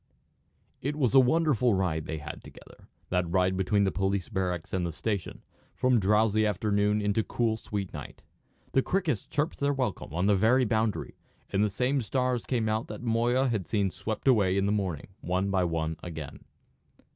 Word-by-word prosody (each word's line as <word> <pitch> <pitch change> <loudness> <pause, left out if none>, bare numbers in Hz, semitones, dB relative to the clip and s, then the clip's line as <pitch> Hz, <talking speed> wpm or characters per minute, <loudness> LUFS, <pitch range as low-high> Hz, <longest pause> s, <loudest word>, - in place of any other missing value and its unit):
It 140 +3 -2
was 135 -5 +1
a 135 - +8
wonderful 130 -4 +3
ride 85 -5 -1
they 80 - -3
had 75 - -8
together, - - -15 0.2
that 90 -2 0
ride 95 +1 +2
between 95 +2 +2
the 95 - +2
police 95 0 -1
barracks 90 -5 -2
and 95 -1 0
the 85 - -2
station, 100 +4 -4
and - - -36
from 125 -2 +3
drowsy 105 +2 +3
afternoon 105 0 +1
into 105 +2 +1
cool 115 -1 0
sweet 100 -3 -5
night. - - -9 0.5
The 135 - +3
crickets 170 - -1
chirped 150 +1 -2
their 140 0 +1
welcome 130 - -3
on 90 +4 0
the 105 0 +4
very 120 +6 +4
boundary, 110 -1 -1 0.3
and 100 - +2
the 105 - +2
same 130 +6 0
stars 125 +1 -1
came 115 -4 0
out 110 +1 -1
that - - -8
Moya 120 +3 +2
had 105 -8 -2
seen 100 -1 0
swept 110 +7 -5
away 100 -7 +4
in 100 - +2
the 100 - +1
morning, 95 -7 -2
one 90 +3 -1
by 95 -2 +2
one 80 -1 -2
again. 80 -5 -8
105 Hz, 185 wpm, -28 LUFS, 95-120 Hz, 0.5 s, a